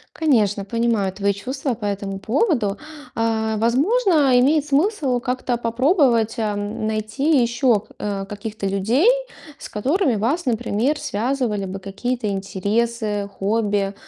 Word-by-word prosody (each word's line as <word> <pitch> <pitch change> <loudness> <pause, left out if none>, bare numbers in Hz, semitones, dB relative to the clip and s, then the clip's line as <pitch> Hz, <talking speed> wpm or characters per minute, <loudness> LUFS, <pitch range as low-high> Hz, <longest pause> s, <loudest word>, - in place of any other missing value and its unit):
Конечно, 215 -10 +2
понимаю 230 -3 0
твои 200 +1 0
чувства 260 +6 -3
по 215 -2 -6
этому 195 -1 -3
поводу. 235 - 0 0.4
А, 220 -1 0
возможно, 285 - +3
имеет 290 +3 +3
смысл 290 - +1
как-то 250 0 -2
попробовать, 240 - +2
эм, 210 -1 -2
найти 220 +7 +1
ещё 235 -1 +2
к - - -19
э, 200 -1 -3
каких-то 205 0 -5
людей, 220 - +2 0.5
с - - -9
которыми 275 - +1
вас, 275 - 0
например, 245 +4 0
связывали 225 -2 -1
бы 190 +1 -6
какие-то 215 +4 -3
интересы, 205 +2 -1
хобби. 205 -1 0
230 Hz, 125 wpm, -21 LUFS, 205-260 Hz, 0.5 s, возможно